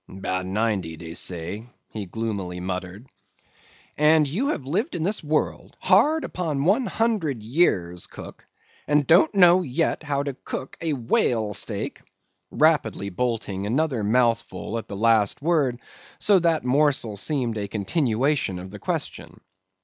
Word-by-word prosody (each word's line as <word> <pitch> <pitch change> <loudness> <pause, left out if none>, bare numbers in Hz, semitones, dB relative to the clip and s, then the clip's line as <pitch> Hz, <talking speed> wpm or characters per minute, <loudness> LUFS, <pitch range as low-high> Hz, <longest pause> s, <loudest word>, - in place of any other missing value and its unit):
"'Bout 95 -1 -3
ninety, 95 -5 -1
dey 80 0 -8
say," 90 +4 -3 0.3
he 105 -3 -6
gloomily 100 -4 -4
muttered. 90 +4 -5 0.9
"And 150 0 +4
you 205 - -1
have 155 - -2
lived 205 - -1
in 160 - -2
this 200 +2 -1
world 150 0 -2
hard 315 +2 +4
upon 155 -6 -2
one 215 - +2
hundred 190 - -1
years, 95 - +1
cook, - - -11 0.4
and 150 -1 +3
don't 170 +3 +5
know 180 -1 +6
yet 155 0 -1
how 145 -2 -1
to 140 -1 -3
cook 130 0 -7
a 165 -2 0
whale 115 -3 +1
steak?" 105 0 -3 0.5
rapidly 145 -10 +1
bolting 105 -2 -2
another 130 -1 0
mouthful 115 0 0
at 110 - -10
the 100 - -6
last 110 -2 +3
word, 145 -6 +1 0.4
so 200 -2 +4
that 165 -5 +1
morsel 135 -5 +2
seemed 125 0 -1
a 100 - -3
continuation 120 - 0
of 95 +1 -8
the 105 - -9
question. - - -4
125 Hz, 140 wpm, -24 LUFS, 100-155 Hz, 0.9 s, know